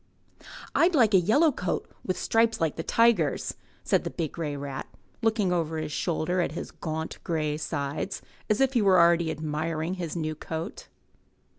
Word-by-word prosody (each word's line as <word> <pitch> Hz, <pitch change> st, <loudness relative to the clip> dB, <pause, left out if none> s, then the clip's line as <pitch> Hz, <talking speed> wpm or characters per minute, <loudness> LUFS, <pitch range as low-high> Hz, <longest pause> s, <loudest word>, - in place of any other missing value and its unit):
''I'd 345 Hz, 0 st, +4 dB
like 225 Hz, -6 st, +4 dB
a 190 Hz, -, +8 dB
yellow 285 Hz, -, +4 dB
coat 180 Hz, -8 st, -2 dB, 0.2 s
with 185 Hz, -, -2 dB
stripes 225 Hz, 0 st, +2 dB
like 160 Hz, -3 st, 0 dB
the -, -, -3 dB
tiger's," 205 Hz, -6 st, +2 dB, 0.3 s
said -, -, +2 dB
the -, -, -3 dB
big 160 Hz, -3 st, -3 dB
grey 150 Hz, -4 st, -4 dB
rat, 140 Hz, -1 st, -5 dB, 0.3 s
looking 220 Hz, -5 st, +2 dB
over 165 Hz, -2 st, -1 dB
his 155 Hz, -1 st, -3 dB
shoulder 175 Hz, +3 st, 0 dB
at 160 Hz, -, -1 dB
his -, -, -6 dB
gaunt 160 Hz, 0 st, -5 dB
grey 155 Hz, -3 st, -1 dB
sides, 150 Hz, +4 st, -3 dB, 0.3 s
as 215 Hz, -, +2 dB
if 270 Hz, 0 st, +3 dB
he 240 Hz, -, +3 dB
were 190 Hz, -3 st, +5 dB
already 170 Hz, -1 st, +4 dB
admiring 160 Hz, +3 st, -2 dB
his 170 Hz, -1 st, -4 dB
new 155 Hz, -2 st, -2 dB
coat. 160 Hz, +4 st, -6 dB
170 Hz, 170 wpm, -27 LUFS, 155-200 Hz, 0.3 s, a